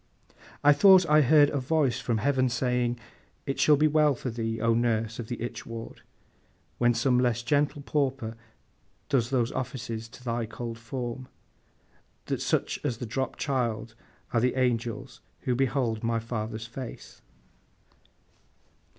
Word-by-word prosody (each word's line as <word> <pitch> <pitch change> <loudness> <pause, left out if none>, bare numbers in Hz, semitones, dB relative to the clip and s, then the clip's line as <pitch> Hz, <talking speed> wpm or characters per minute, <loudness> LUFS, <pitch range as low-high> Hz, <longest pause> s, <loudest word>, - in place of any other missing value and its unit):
I 145 0 +7
thought 185 +3 +7
I 150 0 +6
heard 145 +1 +5
a 145 - -1
voice 135 -2 +1
from 115 -2 -1
Heaven 130 +2 +2
saying, 120 0 0 0.5
It 135 - -3
shall 150 - +6
be 155 +2 +4
well 150 -2 +3
for 125 +1 -4
thee, 115 -1 -3
O 115 +1 +2
nurse 115 -1 0
of 115 - -5
the 120 - -5
itch 120 - -5
ward, 115 0 -8 0.8
when 120 -1 +3
some 125 +1 +2
less 120 -1 +1
gentle 145 +1 +1
pauper 135 -6 -1 0.7
does 120 -4 +2
those 125 -4 +1
offices 115 -3 -5
to 125 - -14
thy 115 -2 -2
cold 115 +1 -6
form, 120 +2 -5 1.0
that - - -2
such - - 0
as 125 -6 -1
the 120 - -5
dropped 130 +4 -3
child 115 -5 -2 0.4
are 115 - +3
the 125 +2 +1
angels 120 -3 -1 0.2
who 125 - 0
behold 125 -3 0
my 115 0 +1
Father's 110 -1 -4
face! 120 +1 -9
120 Hz, 150 wpm, -27 LUFS, 115-135 Hz, 1.0 s, I